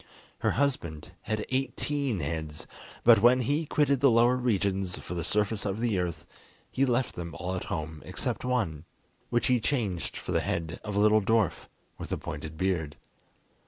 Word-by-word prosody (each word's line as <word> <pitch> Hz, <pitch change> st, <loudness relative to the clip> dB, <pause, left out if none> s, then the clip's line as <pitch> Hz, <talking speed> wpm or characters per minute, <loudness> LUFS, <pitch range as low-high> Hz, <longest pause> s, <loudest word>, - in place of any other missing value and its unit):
Her -, -, +1 dB
husband 85 Hz, -, -1 dB
had 110 Hz, -1 st, -2 dB
eighteen 130 Hz, -, -1 dB
heads, 75 Hz, 0 st, -4 dB, 0.4 s
but 115 Hz, -3 st, +7 dB
when 125 Hz, +2 st, +6 dB
he 145 Hz, +6 st, 0 dB
quitted 140 Hz, -3 st, +2 dB
the 140 Hz, +1 st, +6 dB
lower 120 Hz, +2 st, +5 dB
regions 100 Hz, -6 st, 0 dB
for -, -, -7 dB
the 85 Hz, -1 st, -2 dB
surface 105 Hz, +4 st, 0 dB
of 100 Hz, +1 st, -2 dB
the 115 Hz, -5 st, +1 dB
earth, 85 Hz, -3 st, -3 dB, 0.5 s
he 135 Hz, +1 st, +2 dB
left 125 Hz, +1 st, +1 dB
them 85 Hz, -3 st, -6 dB
all 90 Hz, +1 st, -3 dB
at 95 Hz, -, -3 dB
home 80 Hz, -1 st, -4 dB
except -, -, -3 dB
one, 105 Hz, -12 st, -1 dB, 0.4 s
which 120 Hz, 0 st, +1 dB
he 125 Hz, -1 st, +3 dB
changed 110 Hz, -, -1 dB
for -, -, -5 dB
the -, -, +2 dB
head 80 Hz, 0 st, -3 dB
of 105 Hz, -2 st, -4 dB
a -, -, +2 dB
little 105 Hz, +1 st, +5 dB
dwarf, 110 Hz, -3 st, +1 dB, 0.3 s
with -, -, -7 dB
a -, -, 0 dB
pointed 80 Hz, 0 st, -6 dB
beard. 85 Hz, -5 st, -1 dB
105 Hz, 175 wpm, -29 LUFS, 85-125 Hz, 0.5 s, but